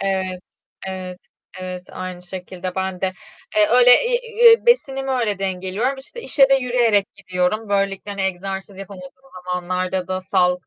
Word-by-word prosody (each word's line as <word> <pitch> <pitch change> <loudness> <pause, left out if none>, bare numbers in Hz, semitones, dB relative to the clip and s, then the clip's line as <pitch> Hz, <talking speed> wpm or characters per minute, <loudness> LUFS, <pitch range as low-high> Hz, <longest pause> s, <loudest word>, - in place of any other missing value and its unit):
Evet. 190 -2 -2 0.5
Evet. 185 -1 -6 0.4
Evet, 185 0 -6
aynı 185 -1 -6
şekilde 180 0 -7
ben 190 -1 -3
de. 190 -1 0 0.4
Eee, 210 -1 +6
öyle, 245 - +6
iii, 485 0 +1 0.2
eee, 465 +1 +7
besinimi 270 - +2
öyle 225 -6 0
dengeliyorum. 195 +7 -2
İşte 470 - -9
işe 275 - +4
de 270 - +5
yürüyerek 240 -6 +2
gidiyorum. 185 +4 -1
Böylelikle 195 0 -1
hani 200 -1 -3
egzersiz 190 +1 -4
yapamadığım 190 -2 -9 0.4
zamanlarda 180 +1 -2
da 185 0 -2
sağlıklı 180 -1 +1
190 Hz, 145 wpm, -21 LUFS, 185-235 Hz, 0.5 s, eee